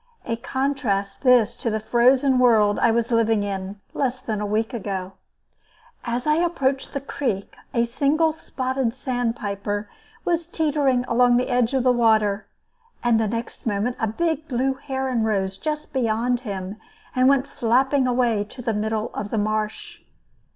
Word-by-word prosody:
A 230 - -1
contrast, 235 -6 -2
this, 250 -5 +4
to 230 - -2
the 220 0 -1
frozen 255 +4 +3
world 220 -4 +4
I 235 - +4
was 235 +1 +1
living 225 -2 +2
in, 195 0 -4
less 255 -2 0
than 215 -5 -3
a 210 - -2
week 220 +3 -1
ago. 195 -4 -4 0.9
As 240 0 -2
I 300 0 +3
approached 280 -7 0
the - - 0
creek, 240 -8 -3 0.2
a 235 0 +2
single 295 +6 +1
spotted 260 -5 -2
sandpiper 215 -6 -3 0.3
was 335 -1 0
teetering 290 -6 +1
along 245 +1 +4
the 250 - 0
edge 245 +1 +2
of 260 - +2
the 255 - +5
water, 220 -4 +2 0.6
and 235 -2 +3
the 220 - +1
next 230 +2 -5
moment 215 +4 0
a 225 - +1
big 320 +6 -1
blue 265 +1 0
heron 265 -3 -2
rose 195 -3 0
just 300 +6 -4
beyond 240 -1 +1
him 200 -4 -5 0.4
and 255 +1 +5
went 275 -1 +3
flapping 265 +2 +2
away 240 -4 +2
to 250 +4 -11
the 230 -2 0
middle 215 +1 -2
of 205 - -4
the 225 - -2
marsh. 215 - -2
240 Hz, 160 wpm, -23 LUFS, 215-265 Hz, 0.9 s, the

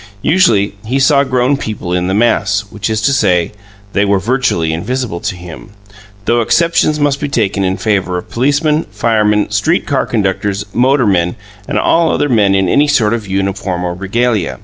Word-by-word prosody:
Usually 110 - +2
he 125 +5 -2
saw 140 +1 +4
grown 130 +1 +1
people 105 -8 -5
in 90 0 0
the 95 - 0
mass, 105 -2 +1
which 105 +1 -4
is 110 -1 -1
to 135 +5 +2
say, 90 -8 +1 0.4
they 100 - +2
were 100 0 +2
virtually 100 -7 0
invisible 110 +2 -3
to - - -4
him, 90 +4 -11 0.5
though 120 0 +2
exceptions 165 +3 +1
must 145 -1 +1
be 145 - -3
taken 105 -6 0
in 95 0 -1
favour 95 -2 -1
of 90 - -7
policemen, 145 +5 +1
firemen, 105 0 +1
street 155 - +1
car 140 -4 -1
conductors, 100 -2 -1
motormen, 115 -9 +2 0.3
and - - -2
all 165 -1 +2
other 145 - 0
men 105 -5 +3
in 95 -1 +1
any 145 +11 +3
sort 115 -7 +2
of 110 -3 -4
uniform 95 -1 -2
or 90 -1 -2
regalia. 105 +1 -1
105 Hz, 175 wpm, -14 LUFS, 95-130 Hz, 0.5 s, saw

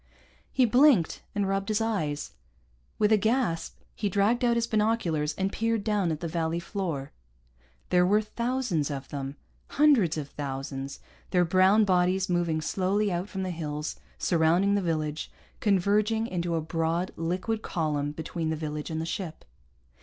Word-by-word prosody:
He 260 - +4
blinked, 245 - +4
and 200 -1 +1
rubbed 195 +1 -1
his 215 0 +2
eyes. 170 - -2 0.7
With 210 0 +3
a 215 - +6
gasp 220 -5 0 0.2
he 205 - -2
dragged 205 +6 +2
out 240 -1 +3
his 235 0 +1
binoculars 210 -9 0
and 190 +1 -1
peered 225 -1 0
down 205 -5 +1
at 155 - -4
the 170 - -2
valley 165 0 -1
floor. 170 -7 -4 0.8
There 180 0 +5
were 200 +4 +4
thousands 235 - -1
of 135 -2 -5
them, 140 -1 -5 0.3
hundreds 265 - +4
of 145 -2 -4
thousands, 135 -1 -5 0.3
their 180 -2 +3
brown 190 +5 +5
bodies 185 0 +2
moving 170 -3 +1
slowly 195 +5 0
out 180 +3 -2
from 190 -1 -4
the 185 - -2
hills 150 -2 -4 0.2
surrounding 175 +4 +3
the 200 - +2
village, 155 -3 -2 0.3
converging 210 +3 +2
into 175 -5 -2
a 165 - 0
broad, 165 +3 -1
liquid 185 +7 -2
column 150 -6 -1
between 160 +1 -4
the 160 - 0
village 150 -1 -4
and 160 -1 -3
the 160 - -2
ship. 165 -1 -5
180 Hz, 160 wpm, -28 LUFS, 160-210 Hz, 0.8 s, a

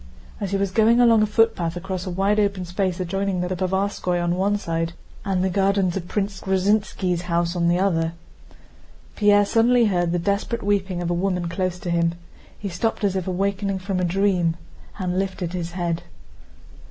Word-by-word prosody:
As 200 - -3
he 195 - 0
was 195 -1 -1
going 225 +4 +4
along 230 -3 +6
a 215 - +3
footpath 210 -6 +1
across 185 0 -4
a - - -1
wide 195 +4 +1
open 200 -3 0
space 180 +1 -2
adjoining 190 +1 -1
the 180 +1 -2
Povarskóy 190 -1 -1
on 175 0 0
one 200 +3 +1
side 165 -3 -2 0.3
and 190 -2 0
the 190 - +1
gardens 195 -1 +1
of 180 -3 -4
Prince 195 -1 -2
Gruzínski's 190 -2 +1
house 170 +1 0
on 170 -1 +1
the 175 +1 +3
other, 165 -4 +1 1.0
Pierre 205 -1 +4
suddenly 235 +3 +4
heard 175 -4 +1
the 175 - +1
desperate 200 +6 -1
weeping 190 -3 0
of 175 - -1
a - - +2
woman 180 0 -1
close 180 +1 -2
to 175 -1 -4
him. 170 0 +1 0.4
He 205 - -5
stopped 200 +5 -2
as 195 -2 +1
if 190 -1 -2
awakening 195 +1 -1
from 190 0 -3
a - - 0
dream 180 -2 +1 0.4
and 185 -2 -1
lifted 185 -2 -3
his 175 -1 -4
head. 170 -2 -2
190 Hz, 185 wpm, -23 LUFS, 175-200 Hz, 1.0 s, along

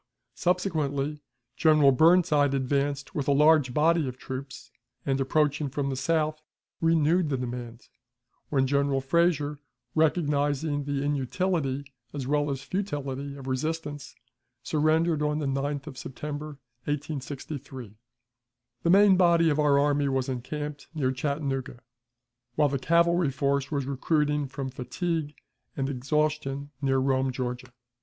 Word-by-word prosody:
Subsequently, 155 -5 -1 0.3
General 150 0 +5
Burnside 150 -1 +4
advanced 140 +1 -1
with 145 -3 -2
a - - +4
large 150 -2 +5
body 160 +2 +2
of 125 0 -6
troops, 130 +1 -8 0.3
and, 135 0 0
approaching 145 +1 +1
from 140 +1 -2
the - - -2
south, 155 +2 0 0.4
renewed 165 +1 +3
the 135 - 0
demand, 120 -1 -6 0.6
when 135 -2 +2
General 140 0 +1
Frazier, 150 0 +1 0.3
recognizing 145 -2 +1
the 140 -1 -1
inutility 145 0 -1 0.3
as 135 -3 -3
well 145 +2 +1
as 135 -1 -3
futility 140 -6 -4
of 135 -2 -10
resistance, 145 +1 -3 0.5
surrendered 155 +1 +2
on 150 0 0
the 150 - -2
9th 140 +1 -2
of 135 -4 -8
September, 150 +2 -6 0.3
1863. 140 -4 -5 0.9
The 170 - 0
main 195 +1 +7
body 170 -3 +4
of 150 - 0
our 145 -2 +4
army 145 0 +2
was 135 -1 0
encamped 145 +3 -5
near 135 -4 +1
Chattanooga, 135 -2 -3 0.8
while 150 -1 +3
the 140 0 -1
cavalry 170 +2 +3
force 140 0 0
was 140 -3 -1
recruiting 150 +1 0
from 135 0 -5
fatigue 155 +3 -3 0.4
and 135 0 -1
exhaustion 145 +1 -1
near 135 -1 +2
Rome, 130 0 +1
Georgia. 125 0 -4
145 Hz, 130 wpm, -27 LUFS, 135-155 Hz, 0.9 s, main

